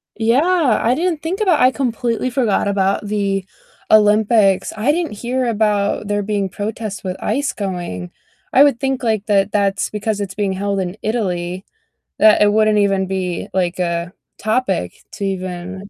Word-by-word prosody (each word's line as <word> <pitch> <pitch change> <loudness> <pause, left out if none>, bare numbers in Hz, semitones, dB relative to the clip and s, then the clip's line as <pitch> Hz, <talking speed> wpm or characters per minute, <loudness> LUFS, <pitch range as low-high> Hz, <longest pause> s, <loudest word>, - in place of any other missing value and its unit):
Yeah, 280 +8 +2
I 235 +3 +2
didn't 330 0 -1
think 360 +6 -3
about 365 -7 +3
I 255 - +5
completely 245 -2 -1
forgot 240 -6 0
about 200 +1 0
the 200 -2 -1 0.4
Olympics, 210 -2 +4
I 220 +7 +1
didn't 335 -4 -2
hear 250 +4 -2
about 210 -2 0
there 205 0 -1
being 200 -1 -1
protests 205 0 -5
with 185 -1 -3
ICE 285 0 -1
going. 175 - -5 0.4
I 270 - +6
would 280 -5 +3
think, 265 -1 -2
like, 220 -3 0
that 200 -1 +2
that's 200 -1 0
because 210 0 -2
it's 200 -2 -4
being 200 -1 -1
held 200 +1 -2
in 185 +1 -4
Italy 185 -5 -2 0.5
that 215 -1 +5
it 205 0 +5
wouldn't 215 0 +3
even 195 -2 +2
be, 185 -2 -3
like, 180 -1 -1
a 170 0 -2 0.2
topic 215 - -1 0.2
to 200 - -4
even 185 0 -5
205 Hz, 160 wpm, -18 LUFS, 190-235 Hz, 0.5 s, I